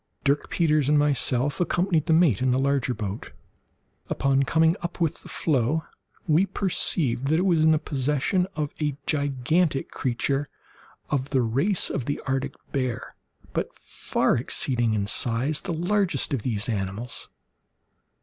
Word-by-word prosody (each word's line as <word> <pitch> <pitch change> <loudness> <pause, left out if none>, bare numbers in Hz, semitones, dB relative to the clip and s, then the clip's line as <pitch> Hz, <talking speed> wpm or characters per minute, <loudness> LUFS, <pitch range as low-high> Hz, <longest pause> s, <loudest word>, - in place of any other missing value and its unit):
Dirk 140 +1 +1
Peters 155 -4 +2
and 150 - +4
myself 145 -1 +1
accompanied 175 -2 +1
the - - +2
mate 160 - +4
in 130 - +2
the 125 - +2
larger 135 -1 +1
boat. 105 -1 -5 0.8
Upon 135 0 +2
coming 160 +4 +3
up 175 +1 -5
with 165 -3 0
the - - -11
floe, 150 +1 +1 0.4
we 165 +5 +3
perceived 165 - 0
that 155 +3 +3
it 180 - +1
was 170 -4 +3
in 160 - +5
the 160 - +5
possession 150 +6 0
of 150 -2 -3
a 150 -2 -1
gigantic 145 +1 0
creature 135 +3 -1 0.6
of 140 -2 0
the 130 -3 +2
race 140 - +1
of 130 - -2
the 145 - -2
Arctic 135 0 -2 0.2
bear, 130 -4 -3 0.4
but - - -3
far - - 0
exceeding 120 -2 0
in 100 -1 0
size 120 +7 +1
the 190 - -4
largest 175 -3 +1
of 130 - 0
these 110 -2 0
animals. 105 +2 -3
140 Hz, 150 wpm, -25 LUFS, 125-160 Hz, 0.8 s, in